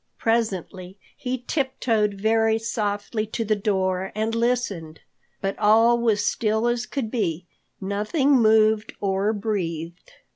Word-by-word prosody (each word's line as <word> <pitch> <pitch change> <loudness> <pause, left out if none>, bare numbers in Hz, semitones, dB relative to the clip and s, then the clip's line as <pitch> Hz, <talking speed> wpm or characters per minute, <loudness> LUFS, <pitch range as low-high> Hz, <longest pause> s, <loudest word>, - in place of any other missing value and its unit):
Presently 195 -4 -2 0.2
he 255 0 -3
tiptoed 230 -8 0
very 220 +2 +2
softly 215 -1 -2
to 225 +1 -3
the 215 0 +2
door 190 -2 -1
and 220 +1 -1
listened. 230 -9 -1 0.4
But 195 0 -3
all 225 +3 +5
was 220 -3 +1
still 220 +1 +1
as 240 0 -1
could 250 -6 -3
be—nothing 200 - -2
moved 220 -3 +4
or 195 +1 0
breathed. 180 -6 -4
215 Hz, 115 wpm, -24 LUFS, 195-230 Hz, 0.4 s, all